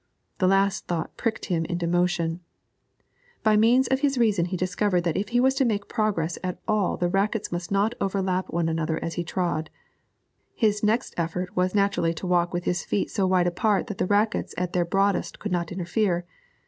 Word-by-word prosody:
The 185 - +3
last 195 0 +2
thought 170 -2 -3
pricked 230 -2 -2
him 170 -3 0
into 175 0 -2
motion. 175 -1 0 1.0
By 215 -1 +4
means 235 +5 +4
of 265 - +2
his 275 -2 +1
reason 210 -7 +3
he 180 +1 -3
discovered 185 +1 +1
that 170 -2 -1
if 205 +1 -2
he 245 - +2
was 265 +1 +4
to - - +6
make 210 -4 -1
progress 195 -8 -1
at 180 -1 -3
all 215 -4 +1
the 175 - +1
rackets 195 +4 0
must 175 0 -4
not 200 +3 +2
overlap 190 -1 0
one 170 -1 0
another 160 0 -1
as 165 - -3
he 175 - -2
trod; 170 -2 -2 0.9
his 210 -2 +1
next 220 +3 +1
effort 175 +2 -3
was 180 +2 +1
naturally 200 -5 +1
to 175 - -6
walk 175 -1 +2
with 175 0 -2
his 175 0 -1
feet 200 - -1
so 195 -3 +1
wide 185 -1 +3
apart 200 +4 +1
that 210 -5 -7
the - - +1
rackets 210 +2 +1
at 180 -1 -2
their 175 -1 +2
broadest 195 +3 0
could - - -5
not 170 -2 -1
interfere. 180 0 0
185 Hz, 200 wpm, -25 LUFS, 175-210 Hz, 1.0 s, to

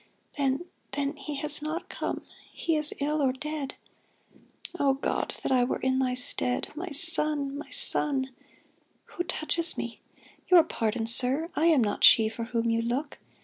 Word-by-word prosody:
Then 275 +3 0
— - - -41
then 285 +1 -2
He 290 +1 -6
has 300 +1 +2
not 310 +3 -4
come - - -5
— - - -24
he 330 -2 -1
is 300 -1 +3
ill, 300 +1 0
or 265 -2 +3
dead 300 +1 -5 1.0
I 360 - -3
O 275 -1 +4
God, 270 - -2
that - - -2
I 255 -2 +4
were 245 - -1
in 260 0 0
thy 255 -1 0
stead. 250 0 -1
My 345 +4 -5
son! 300 -2 +1
my 295 - -8
son! 270 -3 +1 0.8
Who 350 - -1
touches 330 0 +1
me_? 235 -1 -6 0.5
Your 355 -3 +7
pardon, 225 -6 -2
sir. 260 +8 +2
I 320 - +2
am 305 -7 +4
not 205 -1 -2
she 220 -1 +7
For 230 +1 -6
whom 230 0 -1
you 230 0 +1
look. 255 +6 -3
280 Hz, 180 wpm, -27 LUFS, 250-305 Hz, 1.0 s, Your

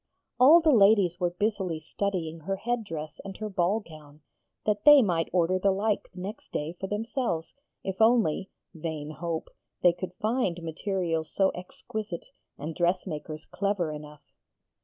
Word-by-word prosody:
All 300 +7 +8
the 315 -1 +4
ladies 200 -5 +5
were 175 -1 +2
busily 185 -2 -1
studying 165 -1 -3
her 195 +5 -2
head 235 +4 -2
dress 155 -5 -6
and 195 -1 -8
her 215 -1 -4
ball 190 +4 +1
gown, 155 -4 -14 0.4
that 210 -1 0
they 295 -3 +9
might 170 -5 0
order 185 +1 +2
the 195 - +3
like 205 +2 0
next 190 +3 -7
day 150 +3 -3
for 190 +2 -6
themselves, 210 - -2 0.3
if 190 +2 -3
only 220 -6 +3 0.2
(vain 155 -2 -5
hope!) 165 0 -4 0.3
they 175 - +6
could 180 +1 -6
find 210 -7 -1
materials 165 -1 -2
so 195 -1 +2
exquisite 185 +1 -6 0.3
and 155 +3 -5
dressmakers 165 -3 -2
clever 195 -5 -1
enough. 150 -1 -9
185 Hz, 150 wpm, -28 LUFS, 165-205 Hz, 0.4 s, they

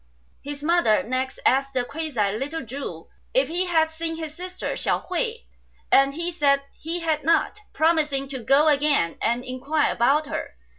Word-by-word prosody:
His 290 0 -7
mother 330 -10 +3
next 255 +2 -2
asked 275 +1 +2
(the 250 - +2
quasi) 280 -9 -1
little 285 +5 -4
Chu 225 - -7 0.3
if - - +3
he 355 +3 0
had 320 -2 +2
seen 325 0 -4
his 315 -2 -6
sister, 365 +2 -5
Hsiao - - -1
hui; 460 +6 -3 0.5
and 275 +1 +5
he 340 +2 -2
said 280 -4 +2
he 335 +2 -4
had 315 -2 0
not, 335 +6 +2
promising 305 -4 +1
to 265 -1 -5
go 275 +6 +4
again 285 - +2
and 240 +2 0
inquire 275 +4 0
about 280 +6 +3
her. 300 - -5
295 Hz, 165 wpm, -24 LUFS, 270-325 Hz, 0.5 s, and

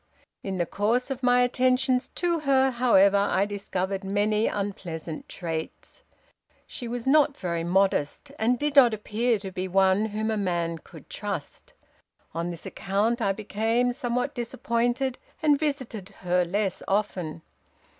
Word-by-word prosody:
In 190 -1 -4
the 175 - +1
course 230 +9 0
of 265 -1 -4
my 250 -1 +4
attentions 255 +1 +2
to 345 -2 0
her, 270 -2 +3
however, 215 -5 +4
I 200 0 +2
discovered 195 -1 -3
many 210 +2 +1
unpleasant 175 -6 -5
traits. 165 -3 -5 0.6
She 245 - -6
was 235 0 -4
not 290 0 +4
very 170 -3 -2
modest, 190 - +1
and 240 +3 +2
did 295 +1 -2
not 245 -5 +7
appear 220 +3 0
to 195 -1 -7
be 185 0 -3
one 190 +2 +3
whom 220 +1 -2
a 220 - 0
man 170 -4 -1
could - - -15
trust. - - -6 0.6
On 170 +1 -2
this 170 -2 -7
account, 215 +5 -1
I 200 - +2
became 225 +4 0
somewhat 245 -1 -2
disappointed, 240 +2 -1 0.2
and 295 -2 +4
visited 260 -10 -3
her 180 -1 +2
less 195 +2 -1
often. 180 -6 -1
215 Hz, 145 wpm, -26 LUFS, 190-250 Hz, 0.6 s, not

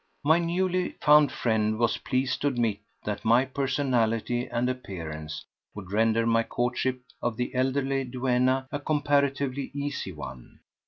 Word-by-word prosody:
My 160 +3 +5
newly 180 +1 0
found 150 0 +6
friend 110 -2 0
was 115 0 +1
pleased 130 0 -1
to 145 - +2
admit 120 -6 0 0.2
that 105 -1 -4
my 120 +4 +4
personality 125 -3 0
and 120 +1 -1
appearance 80 -11 -5 0.3
would 95 -3 -8
render 115 +2 +2
my 115 0 +3
courtship 125 +2 -1 0.2
of 120 -2 -1
the 125 0 -2
elderly 135 +1 0
duenna 130 +1 +1
a 145 - -2
comparatively 140 -2 0
easy 140 -8 -3
one. 70 -6 -10
125 Hz, 140 wpm, -27 LUFS, 115-140 Hz, 0.3 s, found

